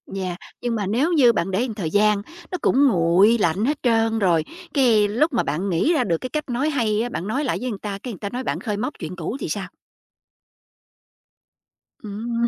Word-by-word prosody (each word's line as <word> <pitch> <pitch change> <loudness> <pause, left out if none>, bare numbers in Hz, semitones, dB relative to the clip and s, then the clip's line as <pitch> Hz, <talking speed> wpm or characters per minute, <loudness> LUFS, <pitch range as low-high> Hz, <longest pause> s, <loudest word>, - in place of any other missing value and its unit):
Yeah, 185 -2 -3 0.3
nhưng 240 -1 -1
mà 210 -3 -1
nếu 270 - +1
như 255 -7 +6
bạn 190 -2 -1
để 190 - 0
một 245 -3 -2
thời 185 -6 -3
gian, 210 +1 +3 0.3
nó 365 - -2
cũng 280 +2 +4
nguội 190 +3 +4
lạnh 195 +2 +1
hết 295 +3 0
trơn 225 -2 +2
rồi, 170 -6 +2 0.3
cái, 230 -7 +4
lúc 270 +10 +1
mà 240 - +2
bạn 170 +8 -2
nghĩ 185 - +2
ra 305 - +2
được 170 -3 0
cái 255 - -6
cách 300 -2 -4
nói 260 +5 0
hay 225 -7 +1
á, 240 - -2
bạn 190 -5 -4
nói 265 +7 -1
lại 265 - -1
với 255 - -2
người 205 -4 -5
ta, 205 -2 -4
cái 245 - -5
người 190 - -11
ta 200 - -4
nói 250 +4 -4
bạn - - -2
khơi 210 -4 -3
móc 250 +7 -2
chuyện 160 +2 -6
cũ 185 - -4
thì - - -4
sao? 195 +2 -3 2.4
Ừm. 230 +3 -2
220 Hz, 225 wpm, -22 LUFS, 195-250 Hz, 2.4 s, như